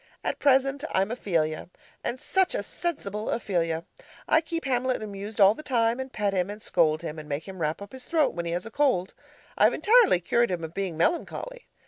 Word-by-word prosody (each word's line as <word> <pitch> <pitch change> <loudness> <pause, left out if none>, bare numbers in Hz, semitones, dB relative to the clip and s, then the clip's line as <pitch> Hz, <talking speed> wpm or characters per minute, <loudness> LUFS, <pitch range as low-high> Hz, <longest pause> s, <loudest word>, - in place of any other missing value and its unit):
At - - -2
present 275 +1 +3
I'm 195 +3 +1
Ophelia 165 -10 -1 0.3
and 250 - -3
such 380 +5 +1
a - - -1
sensible 215 - -3
Ophelia! 170 -7 -1 0.4
I 315 - +4
keep 330 0 -4
Hamlet 255 -2 0
amused 205 +1 -7
all 200 0 +7
the 265 - -9
time, 235 -4 +1
and 260 0 -5
pet 205 -4 -1
him 185 0 0
and 205 +1 -6
scold 165 -6 +1
him 160 -1 -5
and 155 0 -10
make 145 +4 -3
him 190 -2 -8
wrap 155 +5 -1
up 200 - -12
his 260 -1 -9
throat 320 -4 +2
when 170 -1 -4
he - - -2
has 175 +3 -2
a 225 - -8
cold. 245 -10 +1 0.5
I've - - +5
entirely 445 - +5
cured 235 +7 +2
him 175 -3 -3
of 160 0 -6
being 190 -4 -3
melancholy. 415 - -1
210 Hz, 205 wpm, -27 LUFS, 175-265 Hz, 0.5 s, all